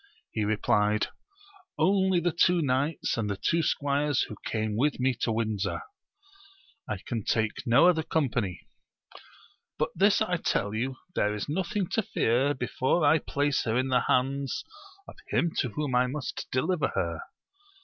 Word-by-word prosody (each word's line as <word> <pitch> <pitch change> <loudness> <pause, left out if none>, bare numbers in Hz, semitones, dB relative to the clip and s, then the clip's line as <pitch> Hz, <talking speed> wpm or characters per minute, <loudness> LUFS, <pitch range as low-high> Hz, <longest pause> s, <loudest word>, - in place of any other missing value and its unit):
He 110 - -1
replied 105 0 +1 0.7
only 190 -2 +3
the 175 +1 0
two 170 +1 +3
knights 135 +2 0
and 110 -2 -1
the 100 - -2
two 165 - +1
squires 145 -2 +1
who 105 - -7
came 110 -1 -1
with 140 +5 +1
me 130 +1 +2
to 115 - +1
Windsor. 110 -3 -1 1.1
I 105 - -1
can 115 -3 -3
take 110 +5 -1
no 125 +9 +6
other 170 -3 +4
company; 125 - -1 1.2
but - - 0
this 200 +4 +4
I 180 -5 +1
tell 100 -9 -1
you, 125 +4 -2 0.2
there 105 -7 +1
is 105 - -4
nothing 185 +5 -1
to 220 - +1
fear 135 - +1
before 130 +5 0
I 150 +2 +5
place 145 0 0
her 115 +1 +1
in 130 +1 0
the 125 -1 +2
hands 135 +1 0 0.4
of - - -12
him 170 - +1
to 130 - 0
whom 145 +3 -3
I 125 +1 +3
must 130 0 -5
deliver 150 +4 +1
her. - - -1
130 Hz, 160 wpm, -28 LUFS, 110-160 Hz, 1.2 s, no